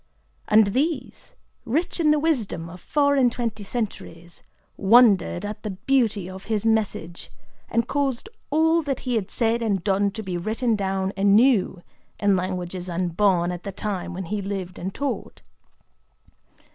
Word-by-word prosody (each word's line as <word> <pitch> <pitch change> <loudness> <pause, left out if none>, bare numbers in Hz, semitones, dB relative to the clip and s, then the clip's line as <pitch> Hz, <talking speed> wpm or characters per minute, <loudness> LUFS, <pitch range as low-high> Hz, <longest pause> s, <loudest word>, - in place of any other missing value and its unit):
And 210 -2 +4
these, 305 +5 -2 0.3
rich 315 +10 -1
in 315 -2 +3
the 300 - +4
wisdom 225 - -1
of 180 0 -12
four 285 -1 +2
and 255 -3 +4
twenty 225 -3 -3
centuries, 190 -6 -5 0.3
wondered 205 -4 +4
at 210 +1 -6
the 215 - -4
beauty 210 -1 0
of 190 +1 -9
his 215 -1 -1
message, 210 -6 -1 0.4
and 230 +1 0
caused 280 - -1 0.2
all 320 +2 +3
that 280 -4 -3
he 250 - -2
had 215 -5 -1
said 230 0 0
and 200 -6 0
done 200 0 +2
to 220 0 -6
be 185 -3 -3
written 225 +5 0
down 195 -1 -1
anew 200 -2 +3 0.4
in 200 -1 +3
languages 180 0 -3
unborn 175 0 +1
at 175 -1 -6
the 200 - -6
time 190 -2 -4
when 190 0 -5
he 205 +4 -3
lived 190 -2 -5
and 190 +2 -5
taught. 280 -1 -4
205 Hz, 155 wpm, -24 LUFS, 185-240 Hz, 0.4 s, And